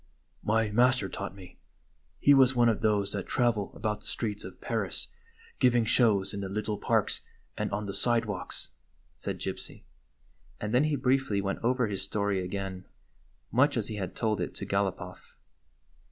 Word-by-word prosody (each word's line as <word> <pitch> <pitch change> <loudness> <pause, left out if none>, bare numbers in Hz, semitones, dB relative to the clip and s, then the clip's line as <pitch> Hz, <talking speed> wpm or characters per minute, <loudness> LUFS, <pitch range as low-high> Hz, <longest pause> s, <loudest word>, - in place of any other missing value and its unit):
" - - -39
My 110 -1 +2
master 125 -1 +4
taught 95 - -5
me. 95 -2 -13 0.6
He 145 - +6
was 130 -2 +6
one 120 -1 +5
of 110 -1 0
those 105 -3 +2
that 100 -2 -3
travel 115 -5 +1
about 105 -1 -2
the - - -13
streets 105 -3 -3
of - - -9
Paris - - -2 0.5
giving 120 -2 +4
shows 105 -4 +3
in 100 - -4
the 95 - -4
little 105 +1 -2
parks - - +1 0.3
and - - -2
on 105 +1 -2
the 100 - -4
sidewalks," 115 -2 -1 0.4
said - - -4
Gypsy; - - -6 0.8
and 105 +1 -3
then 130 +5 +5
he 155 -1 +1
briefly 130 -5 +2
went 100 0 -2
over 125 +1 +2
his 100 -3 -3
story 100 -2 0
again, 95 0 -4 0.7
much 140 +3 +4
as 110 -1 -1
he 110 - -4
had 95 -3 -4
told 110 -2 0
it - - -3
to 100 - -5
Gal 100 0 +2
op 95 - -5
off. 90 0 -11
105 Hz, 180 wpm, -29 LUFS, 100-120 Hz, 0.8 s, He